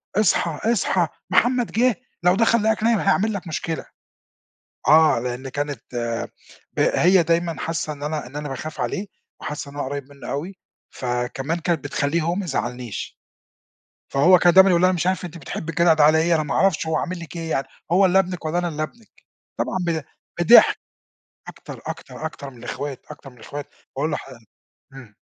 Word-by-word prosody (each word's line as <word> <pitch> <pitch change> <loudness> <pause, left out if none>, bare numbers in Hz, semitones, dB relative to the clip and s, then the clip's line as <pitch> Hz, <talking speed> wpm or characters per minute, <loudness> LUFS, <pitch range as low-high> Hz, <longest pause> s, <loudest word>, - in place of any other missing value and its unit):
"اصحى، 190 -1 +1
اصحى 185 -6 +1 0.2
محمد 240 +5 +2
جِه، 245 0 +3 0.3
لو 180 +1 +5
دخل 230 +1 +3
لقاك 220 0 +1
نايم 230 -1 +3
هيعمل 215 +3 +2
لك 195 -3 -5
مشكلة." 165 0 -3 1.0
آه. 155 -2 +6
لإن 125 +2 -4
كانت 145 -2 -4 1.0
ه - - +2
هي 185 +1 +6
دايمًا 165 0 0
حاسّة 165 -1 -2
إن 145 -1 -11
أنا 150 -2 -3
إن 130 +4 -11
أنا 150 0 -4
باخاف 145 +4 -6
عليه 200 +1 -2 0.3
وحاسّة 145 -1 -5
إن - - -15
أنا 145 - -2
قريّب 140 +1 -5
منّه 140 -1 -9
أوي، 170 +8 -4 0.3
فكمان 130 +5 -2
كانت 170 -4 -1
بتخلّيه 145 +3 0
هو 170 +2 0
ميزعّلنيش. 125 - -4 0.9
فهو 175 +7 +6
كان 175 0 +5
دايمًا 190 +1 +8
يقول 170 -1 +3
لها: 185 - +5
"أنا 185 - 0
مش 175 - -1
عارف 185 0 0
أنتِ 170 -1 -7
بتحبّي 160 +2 -5
الجدع 170 +1 +4
ده 155 -1 +4
على 155 +1 +5
إيه، 170 +2 +3
أنا 155 - +2
ما 150 - -3
أعرفش 195 -5 +2
هو 160 0 0
عامل 180 +4 -2
لِك 170 0 -9
إيه 165 -1 -4
يعني؟ 135 - 0 0.3
هو 190 +2 +5
اللي 185 +1 +4
ابنِك 180 -2 -1
والّا 160 +2 0
أنا 175 0 0
اللي 155 -2 -4
ابنِك." 220 +8 -8 0.5
طبعًا - - -1
ب 165 -2 -1 0.4
بِضِحك. 225 +8 +7 0.7
أكتر، - - -10
أكتر، 160 - -6
أكتر 140 -3 -7
من 125 - -16
الإخوات، 140 +1 -5
أكتر 145 -2 -10
من 125 - -20
الإخوات. 140 +5 -7 0.3
باقول 150 +3 -1
لح 150 - -4 0.7
إمم. 120 -6 -13
160 Hz, 185 wpm, -22 LUFS, 145-185 Hz, 1.0 s, دايمًا